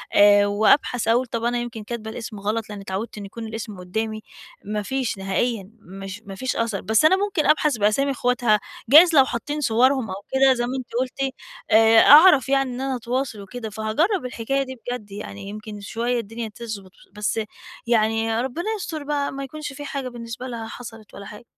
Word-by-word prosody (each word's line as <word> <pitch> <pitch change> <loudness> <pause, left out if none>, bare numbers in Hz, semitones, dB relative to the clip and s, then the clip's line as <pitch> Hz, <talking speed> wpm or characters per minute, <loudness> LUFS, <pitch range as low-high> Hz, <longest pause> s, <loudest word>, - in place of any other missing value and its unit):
آآ 205 0 +7
وأبحث 220 +3 +2
أقول 240 +3 +3
طَب 230 -1 -4
أنا 240 +1 +1
يمكن 240 -2 -5
كاتبة 220 0 -6
الاسم 220 -3 -7
غلط 215 +2 -2
لإنّي 205 -1 -7
اتعوّدت 195 +4 -5
إنّي 205 - -6
يكون 225 +3 -8
الاسم 220 -3 -7
قدّامي، 215 +4 -3 0.4
ما 210 0 -2
فيش 250 -2 -2
نهائيًا، 195 +1 -2
مش 195 +2 -9
ما 195 -1 -8
فيش 260 +6 -3
أثَر، 225 -4 -1
بس 220 +7 +2
أنا 345 +5 +6
ممكن 400 -6 0
أبحث 300 -4 +3
بأسامي 215 +7 +2
أخواتها 245 -4 +2 0.3
جايز 320 +4 +8
لو 270 - +7
حاطّين 290 +5 -4
صُوَرهم 250 -1 +2
أو 190 - -4 0.2
كده 265 0 +5
زي 240 -1 -1
ما 255 +2 -3
أنتِ 255 -2 -6
قُلتِ، 260 +1 -2 0.4
آآ 225 +1 +7
أعرف 295 -1 +8
يعني 270 -1 +2
إن 250 +1 -5
أنا 270 -1 -1
أتواصل 245 -2 -3
وكده، 220 +3 -7
فهاجرّب 235 - 0
الحكاية 250 +3 -1
دي 260 -1 -8
بجد 245 -3 -7
يعني 200 0 -8
يمكن 210 0 -8
شوية 235 +4 -2
الدنيا 225 +1 -6
تظبُط، 215 -5 -7 0.2
بس 210 +2 -1 0.5
يعني 225 0 +1
ربنا 265 +8 -4
يستر 320 -6 -5
بقى 285 -1 -1
ما 275 +1 -5
يكونش 295 +1 -7
في 290 +2 -8
حاجة 275 -2 -4
بالنسبة 235 +1 -7
لها 230 -3 -6
حصَلت 225 -3 -10
ولا 200 - -9
حاجة. 210 +3 -11
230 Hz, 190 wpm, -23 LUFS, 215-265 Hz, 0.5 s, جايز